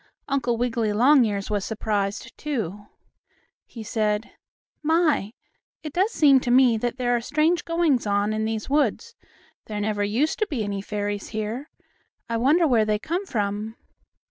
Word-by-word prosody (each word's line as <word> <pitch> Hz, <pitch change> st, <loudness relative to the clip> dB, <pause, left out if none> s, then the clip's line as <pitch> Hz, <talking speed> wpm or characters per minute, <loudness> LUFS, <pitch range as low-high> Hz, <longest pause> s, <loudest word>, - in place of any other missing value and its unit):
Uncle 255 Hz, -4 st, 0 dB
Wiggily 230 Hz, -2 st, 0 dB
Longears 220 Hz, -4 st, +3 dB
was 205 Hz, -2 st, 0 dB
surprised, 205 Hz, -2 st, -3 dB
too. 210 Hz, -, -4 dB, 0.8 s
He 230 Hz, -, -9 dB
said: 215 Hz, 0 st, -1 dB, 0.5 s
"My, 310 Hz, -, +1 dB, 0.5 s
it 305 Hz, -2 st, -6 dB
does 380 Hz, +4 st, +2 dB
seem 280 Hz, -, +5 dB
to 250 Hz, -, -4 dB
me 250 Hz, -1 st, +5 dB
that 240 Hz, +3 st, -2 dB
there 245 Hz, -1 st, +1 dB
are 235 Hz, -, 0 dB
strange 310 Hz, +7 st, +1 dB
goings 330 Hz, -9 st, +1 dB
on 205 Hz, +1 st, +1 dB
in 215 Hz, 0 st, -1 dB
these 220 Hz, -1 st, -3 dB
woods. 295 Hz, -, 0 dB, 0.5 s
There 210 Hz, -1 st, -4 dB
never 205 Hz, 0 st, -1 dB
used 235 Hz, +10 st, 0 dB
to 430 Hz, -, +1 dB
be 260 Hz, -, -2 dB
any 200 Hz, -1 st, -3 dB
fairies 205 Hz, 0 st, -3 dB
here. 220 Hz, +7 st, -4 dB, 0.6 s
I 230 Hz, -, -1 dB
wonder 295 Hz, +9 st, +3 dB
where 235 Hz, -5 st, +3 dB
they 215 Hz, 0 st, +1 dB
come 350 Hz, -, -3 dB
from?" 210 Hz, -, -2 dB
230 Hz, 155 wpm, -24 LUFS, 210-285 Hz, 0.8 s, seem